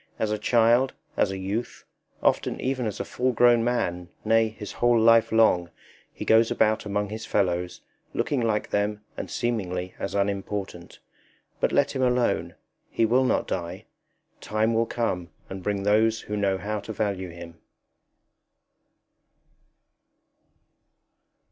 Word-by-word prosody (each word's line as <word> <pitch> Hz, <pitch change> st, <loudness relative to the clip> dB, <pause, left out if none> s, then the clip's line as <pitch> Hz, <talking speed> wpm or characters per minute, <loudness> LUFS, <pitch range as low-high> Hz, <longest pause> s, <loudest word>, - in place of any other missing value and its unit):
As 110 Hz, -1 st, -1 dB
a 105 Hz, -, -1 dB
child, 120 Hz, +4 st, +3 dB, 0.2 s
as -, -, +2 dB
a 95 Hz, -, -4 dB
youth, 100 Hz, +5 st, -4 dB, 0.4 s
often -, -, +1 dB
even 130 Hz, -2 st, -1 dB
as 105 Hz, -, -5 dB
a -, -, -3 dB
full 130 Hz, 0 st, -1 dB
grown 120 Hz, 0 st, +5 dB
man, 90 Hz, -8 st, -1 dB, 0.2 s
nay, 115 Hz, +1 st, +4 dB
his 110 Hz, -1 st, -8 dB
whole 120 Hz, -1 st, +3 dB
life 115 Hz, 0 st, +5 dB
long, 110 Hz, -6 st, +3 dB, 0.4 s
he -, -, -7 dB
goes 110 Hz, +1 st, +5 dB
about 110 Hz, -1 st, +1 dB
among 105 Hz, 0 st, -1 dB
his 110 Hz, +1 st, -6 dB
fellows, 90 Hz, -2 st, -1 dB, 0.3 s
looking 140 Hz, -4 st, -1 dB
like 110 Hz, -2 st, -1 dB
them 105 Hz, +1 st, 0 dB
and -, -, -6 dB
seemingly 90 Hz, -6 st, -2 dB
as -, -, -4 dB
unimportant. 100 Hz, -3 st, -3 dB, 0.6 s
But -, -, +1 dB
let 140 Hz, 0 st, +2 dB
him 130 Hz, -, -3 dB
alone; 125 Hz, -1 st, +1 dB, 0.3 s
he 115 Hz, -, +1 dB
will 125 Hz, +4 st, +3 dB
not -, -, +1 dB
die. 85 Hz, -2 st, -4 dB, 0.5 s
Time 110 Hz, +2 st, 0 dB
will 115 Hz, 0 st, +1 dB
come 90 Hz, -8 st, -2 dB, 0.2 s
and 95 Hz, 0 st, -6 dB
bring 100 Hz, +1 st, -2 dB
those 110 Hz, +2 st, +3 dB
who 105 Hz, -, -5 dB
know 100 Hz, -2 st, +1 dB
how 105 Hz, +2 st, -3 dB
to 100 Hz, -, -8 dB
value 100 Hz, -4 st, -2 dB
him. 85 Hz, -1 st, -11 dB
105 Hz, 140 wpm, -25 LUFS, 95-115 Hz, 0.6 s, grown